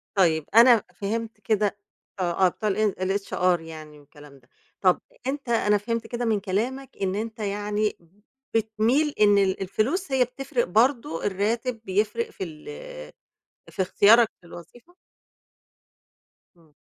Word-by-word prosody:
طيب 160 -5 +3
أنا 235 -2 +7
فهِمت 220 +2 -4
كده 205 0 0 0.4
آه 185 +1 +2
بتوع 210 +4 -2
الإ 210 0 +1 0.2
الHR 180 -3 0
يعني 155 -2 -11
والكلام 145 -1 -16
ده. 120 - -30 0.3
طَب 185 -2 +3 0.3
أنت 275 -2 -4
أنا 210 -3 +3
فهمت 230 +2 -3
كده 240 0 -3
من 220 -3 +1
كلامك 235 +8 -3
إن 190 0 0
أنت 220 +1 -5
يعني 210 +1 -1 0.6
بتميل 225 +7 +1
إن 205 -1 +5
ال 195 -1 +1
الفلوس 270 - -1
هي 260 -1 +4
بتفرِق 265 0 -2
برضه، 230 - +1
الرّاتب 225 +4 -1
بيفرِق 220 - -1
في 310 - -7
ال 155 -3 -9 1.0
في - - -3
اختيارك 220 +5 +5
للوظيفة؟ 230 - -14 1.6
امم. 160 -3 -25
210 Hz, 130 wpm, -25 LUFS, 185-235 Hz, 1.6 s, أنا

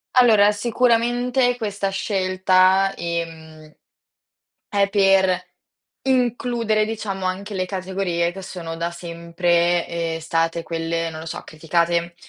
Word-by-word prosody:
Allora, 220 -5 +6
sicuramente 245 +3 +1
questa 205 -3 -2
scelta, 190 -1 +2
ehm, 160 -2 -6 1.0
è 200 -1 +2
per 190 -2 +3 0.6
includere 240 -4 +1
diciamo 210 -3 -4
anche 195 +3 -4
le 185 -1 -1
categorie 185 -2 -2
che 195 +2 -9
sono 170 -3 -7
da 170 +1 -2
sempre, 170 0 0
ehm, 165 -1 -3
state 165 +1 -1
quelle, 165 0 -2
non 160 0 -8
lo 160 - -9
so, 165 - -5
criticate, 170 +2 -1
185 Hz, 110 wpm, -22 LUFS, 170-205 Hz, 1.0 s, Allora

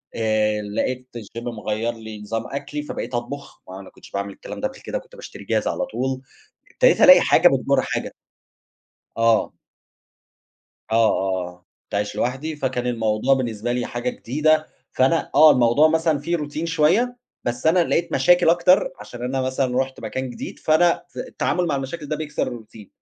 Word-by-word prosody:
آآ 110 -1 +1
لقيت 125 +5 -3
الGym 115 +1 -8
مغيّر 115 -1 -3
لي 110 -2 -9
نظام 115 +2 -4
أكلي 145 +1 -5
فبقيت 150 - -6
أطبخ، 140 +4 -6
ما 95 +1 -9
أنا 95 - -11
كنتش - - -17
باعمل 100 0 -4
الكلام - - -9
ده 265 - +1
قبل 265 - -13
كده - - -4
كنت - - -18
باشتري 485 - -10
جاهز - - 0
على 270 - -1
طول، 130 - -3 0.5
ابتديت - - +3
ألاقي - - +9
حاجة - - +5
بتجُر - - +2
حاجة. - - -3 1.1
آه. 115 -1 +3 1.4
آه، - - +2
آه، 95 -5 +1
آه، 90 0 -15 0.2
كنت - - -7
عايش 105 0 -2
لوحدي، 135 +6 -2
فكان 130 -3 -2
الموضوع 115 +2 +1
بالنسبة 120 -3 -2
لي 120 0 -1
حاجة 120 +1 -3
جديدة، 155 +6 +1 0.2
فأنا 135 +6 +1
آه 155 +2 +9
الموضوع 125 +5 +4
مثلًا 160 -1 +1
فيه 170 +4 -1
Routine 150 +1 -5
شوية، 175 +10 +2 0.3
بس 120 +4 -2
أنا 175 +2 +4
لقيت 170 - 0
مشاكل 175 -1 +4
أكتر 175 +2 +4
عشان 120 0 -9
أنا 130 +1 -1
مثلًا 130 -1 -1
رُحت 130 0 -3
مكان 130 0 -4
جديد، 120 - -8
فأنا 170 +2 +3
في - - -10
التعامل 180 0 -1
مع 155 -4 0
المشاكل 135 +3 -5
ده 155 +1 -2
بيكسر 150 -1 -3
الRoutine، 110 -2 -15
130 Hz, 170 wpm, -22 LUFS, 115-155 Hz, 1.4 s, ألاقي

